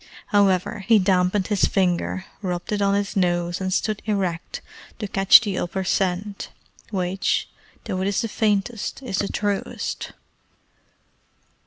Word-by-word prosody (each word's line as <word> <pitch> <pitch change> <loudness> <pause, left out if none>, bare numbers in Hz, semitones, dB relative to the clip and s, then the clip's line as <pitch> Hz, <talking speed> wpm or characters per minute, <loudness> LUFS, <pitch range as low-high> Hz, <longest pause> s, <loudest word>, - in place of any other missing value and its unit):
However, 205 +1 +2
he 225 - +6
dampened 185 0 +2
his 205 -1 +2
finger, 185 0 0 0.2
rubbed 180 -1 -3
it 205 -1 0
on 200 0 +3
his 205 +1 -2
nose, 175 -1 0
and 185 0 -1
stood 210 +2 0
erect 190 -6 -2 0.4
to 210 - -4
catch 195 +2 +7
the 200 -5 -2
upper 190 +2 -2
scent, 195 +2 -1 0.4
which, 190 -2 -1 0.4
though 185 - -2
it 190 - 0
is 200 +2 +1
the 230 - -2
faintest, 215 +3 -1
is 195 -6 -2
the 200 - 0
truest. 205 -1 -3
195 Hz, 140 wpm, -23 LUFS, 185-205 Hz, 0.4 s, catch